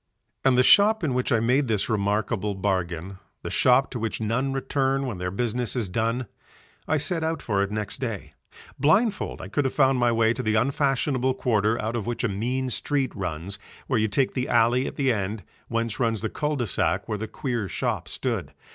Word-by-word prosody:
And 130 Hz, -2 st, +4 dB
the 125 Hz, -, +6 dB
shop 210 Hz, +6 st, +6 dB
in 145 Hz, -5 st, +1 dB
which 125 Hz, +2 st, -1 dB
I 115 Hz, -, +4 dB
made 125 Hz, +5 st, +2 dB
this 110 Hz, -3 st, 0 dB
remarkable 105 Hz, -1 st, 0 dB
bargain, 95 Hz, -1 st, -2 dB, 0.2 s
the -, -, -4 dB
shop 130 Hz, +1 st, +4 dB
to 120 Hz, -, -4 dB
which 115 Hz, -1 st, -2 dB
none 115 Hz, +5 st, 0 dB
return 135 Hz, 0 st, 0 dB
when 115 Hz, -8 st, -4 dB
their 90 Hz, 0 st, -2 dB
business 120 Hz, +5 st, -1 dB
is 120 Hz, -5 st, 0 dB
done: 115 Hz, +6 st, -1 dB, 0.6 s
I 155 Hz, -, +2 dB
set 160 Hz, +2 st, -1 dB
out 160 Hz, 0 st, -1 dB
for 100 Hz, -3 st, 0 dB
it 100 Hz, -, 0 dB
next 105 Hz, -1 st, -3 dB
day. 115 Hz, -7 st, -4 dB, 0.5 s
Blindfold 195 Hz, -, +2 dB
I -, -, -6 dB
could 125 Hz, +9 st, 0 dB
have 130 Hz, -, -2 dB
found 135 Hz, -2 st, +4 dB
my 120 Hz, -1 st, +3 dB
way 115 Hz, 0 st, +3 dB
to 130 Hz, -, -4 dB
the 110 Hz, -2 st, 0 dB
unfashionable 130 Hz, +1 st, +1 dB
quarter 110 Hz, -2 st, +1 dB
out 110 Hz, +1 st, -2 dB
of 115 Hz, -1 st, -3 dB
which 120 Hz, -, -2 dB
a -, -, +3 dB
mean 125 Hz, +6 st, -2 dB
street 140 Hz, +1 st, 0 dB
runs, 90 Hz, +1 st, -4 dB, 0.3 s
where 130 Hz, -4 st, +1 dB
you 110 Hz, -, +2 dB
take 125 Hz, +5 st, +1 dB
the 125 Hz, 0 st, -2 dB
alley 120 Hz, +2 st, +3 dB
at -, -, -6 dB
the 135 Hz, -4 st, +2 dB
end, 100 Hz, 0 st, -3 dB, 0.2 s
whence 115 Hz, -1 st, -2 dB
runs 115 Hz, -4 st, +1 dB
the 110 Hz, -, -2 dB
cul 150 Hz, 0 st, -1 dB
de 125 Hz, -4 st, -1 dB
sac 100 Hz, -, 0 dB
where 105 Hz, -, -3 dB
the 110 Hz, -, -4 dB
queer 120 Hz, -3 st, -3 dB
shop -, -, -2 dB
stood. -, -, -3 dB
120 Hz, 210 wpm, -25 LUFS, 105-135 Hz, 0.6 s, the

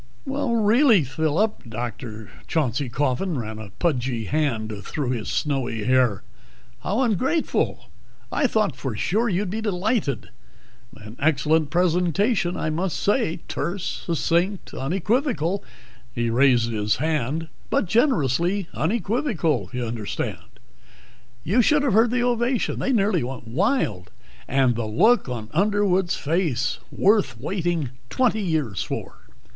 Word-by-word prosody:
"Really, 235 Hz, -, +3 dB
Phillip!" 155 Hz, -, -1 dB
Dr. 110 Hz, -2 st, -6 dB, 0.2 s
Chauncey 140 Hz, -4 st, 0 dB
Coffin 145 Hz, +6 st, -1 dB
ran 110 Hz, -2 st, -5 dB
a 110 Hz, -2 st, -8 dB
pudgy 125 Hz, -8 st, 0 dB
hand 120 Hz, -5 st, -1 dB
through 135 Hz, +3 st, -3 dB
his 115 Hz, -4 st, -3 dB
snowy 130 Hz, -7 st, -1 dB
hair. 125 Hz, -3 st, +2 dB, 0.6 s
"How 210 Hz, +7 st, -1 dB
ungrateful! 260 Hz, -, 0 dB, 0.4 s
I 280 Hz, -, +2 dB
thought 215 Hz, -, +1 dB
for 130 Hz, -4 st, -4 dB
sure 220 Hz, -, +1 dB
you'd 190 Hz, 0 st, -1 dB
be 220 Hz, +2 st, -2 dB
delighted. 200 Hz, -, -1 dB, 0.7 s
An 110 Hz, +2 st, -11 dB
excellent 155 Hz, +1 st, +2 dB
presentation, 180 Hz, -, +1 dB
I 155 Hz, -, -1 dB
must 175 Hz, +3 st, -1 dB
say 205 Hz, -6 st, +1 dB
terse, 185 Hz, +1 st, -3 dB
succinct, 170 Hz, +5 st, 0 dB
unequivocal 195 Hz, -, 0 dB, 0.3 s
" 125 Hz, -1 st, -27 dB
he 120 Hz, -1 st, 0 dB
raised 120 Hz, -2 st, +4 dB
his 105 Hz, -1 st, 0 dB
hand 155 Hz, +1 st, -1 dB, 0.2 s
"but -, -, +1 dB
generously 185 Hz, -, +2 dB
unequivocal, 175 Hz, -, 0 dB
you 125 Hz, -1 st, -3 dB
understand. 110 Hz, -2 st, -3 dB, 1.0 s
You 210 Hz, -, +3 dB
should 295 Hz, +3 st, +3 dB
have 265 Hz, -7 st, +2 dB
heard 225 Hz, +3 st, +5 dB
the 245 Hz, +1 st, +1 dB
ovation 240 Hz, 0 st, 0 dB
they 270 Hz, -, 0 dB
nearly 200 Hz, -, +2 dB
went 125 Hz, -1 st, -6 dB
wild! 135 Hz, -, 0 dB, 0.4 s
And 130 Hz, -2 st, +2 dB
the 115 Hz, -1 st, -2 dB
look 215 Hz, -, +3 dB
on 115 Hz, -3 st, -5 dB
Underwood's 195 Hz, 0 st, +2 dB
face! 145 Hz, -6 st, 0 dB
Worth 195 Hz, -, +2 dB
waiting 170 Hz, -, -1 dB, 0.2 s
twenty 240 Hz, -4 st, +1 dB
years 155 Hz, -, -1 dB
for." -, -, -5 dB
160 Hz, 125 wpm, -24 LUFS, 125-205 Hz, 1.0 s, heard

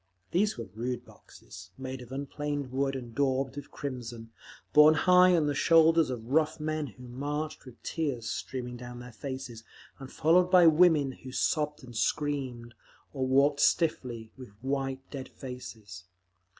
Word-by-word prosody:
These 205 Hz, +1 st, +1 dB
were 115 Hz, -, -5 dB
rude 120 Hz, +3 st, -4 dB
boxes, 90 Hz, +1 st, -14 dB
made 130 Hz, 0 st, -6 dB
of 125 Hz, 0 st, -12 dB
unplaned 140 Hz, 0 st, -4 dB
wood 135 Hz, +1 st, 0 dB
and 120 Hz, -3 st, -7 dB
daubed 135 Hz, +1 st, 0 dB
with 145 Hz, 0 st, -8 dB
crimson, 120 Hz, -5 st, -6 dB, 0.4 s
borne 150 Hz, +1 st, +8 dB
high 180 Hz, +2 st, +6 dB
on 160 Hz, -3 st, +2 dB
the 145 Hz, -, 0 dB
shoulders 165 Hz, +1 st, +5 dB
of 120 Hz, -3 st, -5 dB
rough 155 Hz, +1 st, +2 dB
men 155 Hz, -1 st, -2 dB
who 125 Hz, +1 st, -12 dB
marched 145 Hz, +5 st, -4 dB
with 130 Hz, -3 st, -14 dB
tears 140 Hz, -8 st, -2 dB
streaming 125 Hz, -2 st, -4 dB
down 120 Hz, 0 st, -9 dB
their 125 Hz, 0 st, -10 dB
faces, 130 Hz, -3 st, -7 dB, 0.4 s
and 135 Hz, -1 st, -9 dB
followed 175 Hz, +4 st, +3 dB
by 180 Hz, -2 st, +7 dB
women 160 Hz, -4 st, +5 dB
who 130 Hz, 0 st, -11 dB
sobbed 150 Hz, +2 st, -1 dB
and 120 Hz, -2 st, -11 dB
screamed, 130 Hz, -2 st, -2 dB, 0.4 s
or 130 Hz, -2 st, -1 dB
walked 140 Hz, +2 st, +3 dB
stiffly, 120 Hz, -9 st, +1 dB
with 130 Hz, -3 st, -11 dB
white, 135 Hz, -1 st, -2 dB
dead 135 Hz, -2 st, -6 dB
faces. 110 Hz, -8 st, -9 dB
135 Hz, 155 wpm, -29 LUFS, 125-150 Hz, 0.4 s, borne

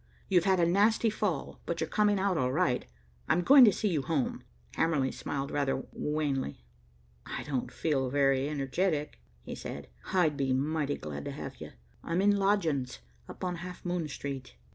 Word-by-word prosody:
You've 180 Hz, -2 st, +3 dB
had 190 Hz, -2 st, +3 dB
a 170 Hz, -, +4 dB
nasty 210 Hz, +5 st, +3 dB
fall, 200 Hz, -9 st, -2 dB
but 170 Hz, -, -2 dB
you're 160 Hz, -, -1 dB
coming 205 Hz, +3 st, +2 dB
out 195 Hz, -1 st, +1 dB
all 130 Hz, -5 st, +1 dB
right. 125 Hz, -, +1 dB, 0.4 s
I'm 175 Hz, -, +3 dB
going 275 Hz, +5 st, +9 dB
to 210 Hz, -, +6 dB
see 210 Hz, +2 st, -1 dB
you 160 Hz, -6 st, 0 dB
home." 140 Hz, -2 st, -1 dB, 0.3 s
Hamerly 150 Hz, -5 st, +1 dB
smiled 140 Hz, 0 st, -4 dB
rather 135 Hz, -2 st, 0 dB
wanly. 140 Hz, -, -2 dB, 0.6 s
"I -, -, -4 dB
don't 135 Hz, -4 st, -3 dB
feel 135 Hz, -5 st, 0 dB
very 135 Hz, 0 st, +2 dB
energetic," 150 Hz, -, -1 dB, 0.2 s
he -, -, -7 dB
said. -, -, -7 dB, 0.2 s
"I'd 160 Hz, -6 st, +2 dB
be 135 Hz, -2 st, +1 dB
mighty 145 Hz, +2 st, 0 dB
glad 75 Hz, -2 st, -6 dB
to -, -, -3 dB
have -, -, -7 dB
you. -, -, -9 dB, 0.3 s
I'm 165 Hz, +2 st, -1 dB
in 205 Hz, +1 st, +4 dB
lodgings 170 Hz, -, +1 dB, 0.3 s
up -, -, -9 dB
on 180 Hz, -1 st, -2 dB
Half 180 Hz, +2 st, -8 dB
Moon 175 Hz, -2 st, -1 dB
Street." 140 Hz, -, -6 dB
155 Hz, 175 wpm, -30 LUFS, 135-185 Hz, 0.6 s, going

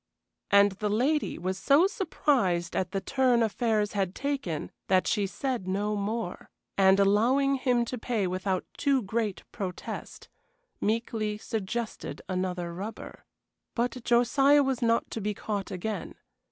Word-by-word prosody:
And 200 Hz, 0 st, +6 dB
the 205 Hz, +2 st, -3 dB
lady 270 Hz, +9 st, +1 dB
was 185 Hz, +2 st, -3 dB
so 290 Hz, +6 st, +5 dB
surprised 250 Hz, -, 0 dB
at 185 Hz, -, 0 dB
the 195 Hz, +1 st, -2 dB
turn 255 Hz, -2 st, +2 dB
affairs 220 Hz, -1 st, +1 dB
had 195 Hz, -3 st, -1 dB
taken 270 Hz, -, -3 dB, 0.2 s
that 185 Hz, -1 st, +3 dB
she 205 Hz, -3 st, +1 dB
said 245 Hz, -2 st, -3 dB
no 205 Hz, +3 st, 0 dB
more, 205 Hz, -1 st, -3 dB, 0.3 s
and, 190 Hz, 0 st, +5 dB
allowing 240 Hz, +8 st, +3 dB
him 250 Hz, -3 st, +1 dB
to 250 Hz, +1 st, -5 dB
pay 220 Hz, -3 st, -1 dB
without 185 Hz, +1 st, -1 dB
too 275 Hz, -3 st, +2 dB
great 210 Hz, 0 st, -2 dB
protest, 185 Hz, -3 st, -6 dB, 0.5 s
meekly 215 Hz, -1 st, -1 dB
suggested 225 Hz, +1 st, -4 dB
another 180 Hz, -2 st, -2 dB
rubber. 200 Hz, +6 st, -7 dB, 0.5 s
But 245 Hz, +1 st, -1 dB
Josiah 270 Hz, +5 st, +4 dB
was 265 Hz, -3 st, -1 dB
not 230 Hz, -1 st, +1 dB
to 225 Hz, -, -4 dB
be 210 Hz, +1 st, -2 dB
caught 205 Hz, -2 st, -3 dB
again. 205 Hz, +4 st, -4 dB
215 Hz, 140 wpm, -28 LUFS, 190-245 Hz, 0.5 s, And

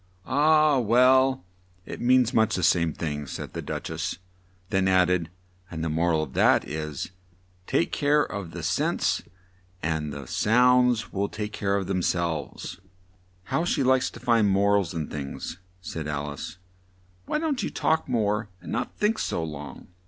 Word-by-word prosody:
"Ah! 150 Hz, +1 st, +4 dB
well, 125 Hz, -1 st, +4 dB, 0.4 s
it -, -, -7 dB
means 125 Hz, -1 st, +4 dB
much 110 Hz, -2 st, +3 dB
the 90 Hz, -, -2 dB
same 85 Hz, -2 st, +3 dB
thing," 75 Hz, -2 st, -4 dB
said -, -, -7 dB
the -, -, -4 dB
Duch -, -, -5 dB
ess, -, -, -3 dB, 0.5 s
then 95 Hz, 0 st, +2 dB
add 90 Hz, -1 st, +4 dB
ed, 85 Hz, -3 st, 0 dB, 0.4 s
"and 80 Hz, -2 st, -5 dB
the 80 Hz, -, -1 dB
mor 85 Hz, +3 st, +1 dB
al 80 Hz, -1 st, +2 dB
of -, -, -8 dB
that -, -, +3 dB
is 75 Hz, +1 st, -4 dB, 0.6 s
'Take -, -, +1 dB
care 150 Hz, 0 st, +3 dB
of 100 Hz, -4 st, -5 dB
the -, -, -7 dB
sense -, -, 0 dB, 0.6 s
and 80 Hz, -2 st, -1 dB
the 70 Hz, -1 st, -7 dB
sounds 125 Hz, -, +3 dB
will 100 Hz, +1 st, -1 dB
take 105 Hz, -1 st, -5 dB
care 100 Hz, -1 st, 0 dB
of 100 Hz, -1 st, -1 dB
themselves.'" 85 Hz, -2 st, -2 dB, 0.6 s
"How 160 Hz, -, -1 dB
she 165 Hz, -5 st, +1 dB
likes 130 Hz, 0 st, +3 dB
to -, -, -12 dB
find 115 Hz, -4 st, +3 dB
mor 100 Hz, +1 st, +3 dB
als 95 Hz, -4 st, 0 dB
in 80 Hz, -2 st, -2 dB
things," 75 Hz, +3 st, -6 dB, 0.2 s
said 80 Hz, -4 st, -5 dB
Al 75 Hz, 0 st, -3 dB
ice. 70 Hz, -, -7 dB, 0.7 s
"Why -, -, 0 dB
don't 305 Hz, -4 st, -1 dB
you -, -, -2 dB
talk 160 Hz, -3 st, 0 dB
more 105 Hz, -3 st, 0 dB
and -, -, -9 dB
not 120 Hz, -, -3 dB
think 215 Hz, +1 st, +1 dB
so 85 Hz, -, -1 dB
long?" 75 Hz, -2 st, -7 dB
100 Hz, 170 wpm, -26 LUFS, 80-125 Hz, 0.7 s, Ah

